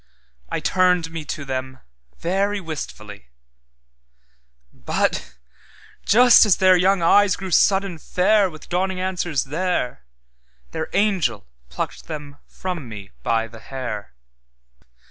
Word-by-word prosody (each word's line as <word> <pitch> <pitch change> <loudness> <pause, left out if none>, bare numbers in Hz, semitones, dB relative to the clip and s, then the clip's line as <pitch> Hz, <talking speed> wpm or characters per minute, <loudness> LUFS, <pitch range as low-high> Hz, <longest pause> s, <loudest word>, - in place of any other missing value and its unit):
I - - -2
turned 180 -3 +2
me 165 -1 -5
to 145 0 -5
them 130 -1 -4 0.4
very 200 +4 0
wistfully; 105 - -8 1.5
But 65 0 -2 0.7
just 245 +3 +7
as 205 -5 +4
their 185 -1 +5
young 185 0 +2
eyes 200 +2 +5
grew 190 -1 -7
sudden 195 -1 +3
fairWith 185 -2 +1
dawning 185 +1 -1
answers 180 -5 -1
there, 150 - -2 0.7
Their 160 0 -4
angel 180 - +1 0.2
plucked 65 - -5
them 145 -3 -7
from 175 -9 -6
me 100 -2 -9
by 115 0 0
the 115 0 -13
hair. 110 - -6
170 Hz, 110 wpm, -22 LUFS, 130-190 Hz, 1.5 s, just